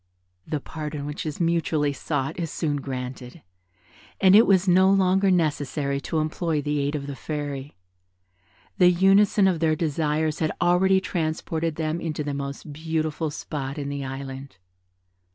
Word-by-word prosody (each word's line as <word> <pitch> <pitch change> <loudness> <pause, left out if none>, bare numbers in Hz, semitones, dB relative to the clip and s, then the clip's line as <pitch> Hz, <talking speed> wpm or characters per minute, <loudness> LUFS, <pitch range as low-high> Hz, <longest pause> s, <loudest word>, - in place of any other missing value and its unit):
The 155 - -2
pardon 150 0 -6
which 150 +2 -5
is 150 - -5
mutually 165 -4 +1
sought 140 +1 -3
is 165 -2 -2
soon 150 -2 -1
granted; 130 +1 -6 0.8
and 190 0 +6
it 220 - +7
was 190 -1 +4
no 185 +1 +5
longer 195 0 +3
necessary 145 -5 0
to 160 - -3
implore 155 +1 -1
the 145 0 -1
aid 140 +2 -1
of 140 -2 -4
the 140 -1 -6
Fairy. 145 -2 -5 1.0
The 180 -1 +7
unison 195 +2 +4
of 180 -4 +1
their 160 -1 +2
desires 155 0 -1
had 155 -1 0
already 190 +2 +3
transported 160 -2 -2
them 160 +1 -2
into 155 -2 -3
the 145 -1 -3
most 140 +1 -6
beautiful 160 0 -2
spot 140 -1 -5
in 140 -1 -3
the 140 -1 -4
Island. 135 -1 -7
155 Hz, 155 wpm, -25 LUFS, 145-170 Hz, 1.0 s, it